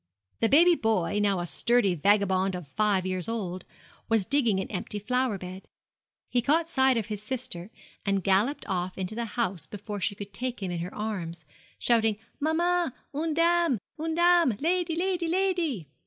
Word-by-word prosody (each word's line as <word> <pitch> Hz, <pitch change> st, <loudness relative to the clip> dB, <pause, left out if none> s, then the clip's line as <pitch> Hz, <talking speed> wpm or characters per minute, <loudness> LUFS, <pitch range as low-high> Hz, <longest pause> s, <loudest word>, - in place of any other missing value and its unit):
The 225 Hz, -, +3 dB
baby 340 Hz, +6 st, +7 dB
boy, 215 Hz, -, 0 dB
now 200 Hz, -3 st, +2 dB
a -, -, -3 dB
sturdy 235 Hz, +1 st, +2 dB
vagabond 190 Hz, +1 st, +2 dB
of 180 Hz, -4 st, -7 dB
five 205 Hz, +2 st, +1 dB
years 185 Hz, +2 st, -2 dB
old, 185 Hz, -5 st, -4 dB, 0.4 s
was 225 Hz, -4 st, +2 dB
digging 235 Hz, -8 st, +2 dB
an -, -, -3 dB
empty 205 Hz, +1 st, -4 dB
flower 250 Hz, +1 st, 0 dB
bed. 185 Hz, +1 st, -9 dB, 0.6 s
He 245 Hz, -, +1 dB
caught 315 Hz, +6 st, +2 dB
sight 265 Hz, -5 st, +3 dB
of 225 Hz, -, -1 dB
his 210 Hz, -1 st, -5 dB
sister, 215 Hz, -6 st, -4 dB, 0.3 s
and 195 Hz, -2 st, 0 dB
galloped 205 Hz, +9 st, +2 dB
off 185 Hz, -1 st, -2 dB
into 190 Hz, +2 st, -3 dB
the 235 Hz, +1 st, -2 dB
house 195 Hz, -8 st, -1 dB
before 205 Hz, 0 st, -6 dB
she 200 Hz, -, 0 dB
could 200 Hz, 0 st, -9 dB
take 250 Hz, -4 st, -4 dB
him 185 Hz, -, -2 dB
in 175 Hz, -, -3 dB
her 180 Hz, +4 st, -5 dB
arms, 175 Hz, -7 st, -4 dB, 0.3 s
shouting, 225 Hz, -3 st, +2 dB, 0.2 s
'Maman, 335 Hz, 0 st, +1 dB, 0.2 s
une 310 Hz, +2 st, -1 dB
dame 335 Hz, -4 st, +3 dB, 0.2 s
une 320 Hz, +1 st, -2 dB
dame! 345 Hz, -9 st, +4 dB
lady, 340 Hz, +1 st, 0 dB
lady, 355 Hz, -1 st, 0 dB
lady!' 340 Hz, -, 0 dB
220 Hz, 170 wpm, -27 LUFS, 190-300 Hz, 0.6 s, baby